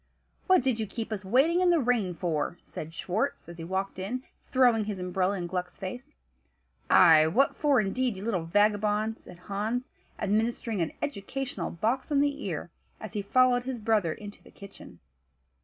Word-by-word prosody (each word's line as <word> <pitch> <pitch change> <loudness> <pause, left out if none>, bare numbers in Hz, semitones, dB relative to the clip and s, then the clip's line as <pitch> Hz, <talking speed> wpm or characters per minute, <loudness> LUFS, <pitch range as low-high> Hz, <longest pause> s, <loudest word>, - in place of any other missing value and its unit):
"What 370 -7 +5
did 255 -4 +1
you 220 - -2
keep 225 +2 -5
us 205 -2 -3
waiting 275 - +3
in 365 - +4
the 345 - +5
rain 230 - +1
for?" 165 0 -2
said 155 - -8
Schwartz, 210 +11 -2
as 170 0 -10
he - - -5
walked 190 +2 -3
in, 240 +7 -4 0.3
throwing 245 -5 +4
his 210 -2 -4
umbrella 185 +2 -1
in 175 - -3
Gluck's 180 0 -4
face. 245 +10 -7 0.7
"Ay! 160 -3 +7
what 245 +13 +2
for, 285 -4 +3
indeed, 230 +3 0
you 195 - -7
little 185 -8 -1
vagabond?" 210 +3 +1
said - - -13
Hans, 215 +7 -3 0.3
administering 220 0 0
an 165 - -2
educational 260 -4 -4
box 230 - -1
on 285 - +3
the 285 0 0
ear, - - -4 0.3
as - - -8
he 210 - -1
followed 250 +4 +3
his 260 -1 -3
brother 215 -6 +1
into 205 -1 -11
the - - -17
kitchen. 200 -1 -13
210 Hz, 175 wpm, -28 LUFS, 185-250 Hz, 0.7 s, Ay